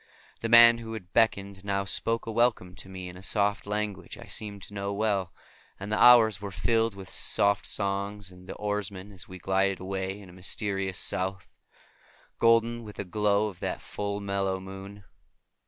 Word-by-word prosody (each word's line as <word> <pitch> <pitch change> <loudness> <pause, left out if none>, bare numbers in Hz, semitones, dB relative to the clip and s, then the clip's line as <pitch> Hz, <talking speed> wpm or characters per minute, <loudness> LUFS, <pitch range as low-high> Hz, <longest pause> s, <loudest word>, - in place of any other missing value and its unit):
The 115 - -2
man 115 0 +9
who 115 -1 -7
had 95 -5 -9
beckoned 100 -4 +1
now 100 -1 -1
spoke 115 +3 -1
a 115 - -4
welcome 110 -6 +1
to 95 - -8
me 95 -1 -7
in 90 - -9
a 90 - -11
soft 100 +1 0
language 105 -1 -3
I - - -11
seemed 100 -2 -6
to 105 - -11
know 100 0 -3
well, 100 -3 0 0.5
and 100 +2 -6
the 105 - +1
hours 110 -4 +7
were 100 - -5
filled 115 +2 0
with 95 -1 -9
soft 100 +3 +2
songs 100 0 -2
of 90 0 -15
the - - -6
oarsmen 105 -1 -4
as 95 -2 -12
we 95 - -9
glided 95 +1 0
away 95 +1 -4
into 95 -3 -13
a - - -16
mysterious 95 0 -2
South, 95 0 -1 0.9
golden 115 0 +3
with 105 -2 -10
the 100 - -5
glow 105 +2 +1
of 95 - -13
that - - -3
full, 100 0 -4
mellow 100 -1 -1
moon. 95 +1 -10
100 Hz, 185 wpm, -28 LUFS, 95-105 Hz, 0.9 s, man